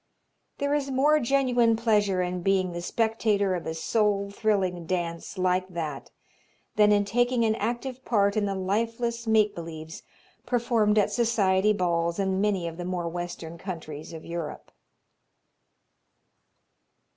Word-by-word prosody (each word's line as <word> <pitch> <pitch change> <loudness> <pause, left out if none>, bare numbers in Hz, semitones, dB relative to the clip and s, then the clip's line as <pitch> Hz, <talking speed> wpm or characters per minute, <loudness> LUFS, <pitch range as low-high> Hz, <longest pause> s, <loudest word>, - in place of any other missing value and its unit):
There 285 0 0
is 285 -2 0
more 290 +4 +3
genuine 245 -3 +3
pleasure 210 -5 +2
in 180 0 -3
being 185 0 +1
the 175 0 -5
spectator 215 -1 +1
of 175 - -4
a 160 - -3
soul 200 +2 0
thrilling 190 -5 0
dance 170 0 -3
like 185 0 +1
that 160 -6 -5 0.7
than 210 0 +5
in 205 -1 +3
taking 245 +2 +1
an 220 - +3
active 245 +3 -3
part 200 -5 +2
in 210 -2 +1
the 195 - -2
lifeless 230 +4 -2
make 215 -2 +3
believes 165 0 -8 0.4
performed 230 -4 +1
at 210 - +3
society 210 -4 +2
balls 170 -3 0
in 190 -1 0
many 195 -4 0
of 165 0 -7
the 180 - -5
more 180 -2 -2
Western 170 -1 -6
countries 160 -5 -7
of 160 -1 -9
Europe. 170 -2 -6
200 Hz, 140 wpm, -27 LUFS, 175-230 Hz, 0.7 s, than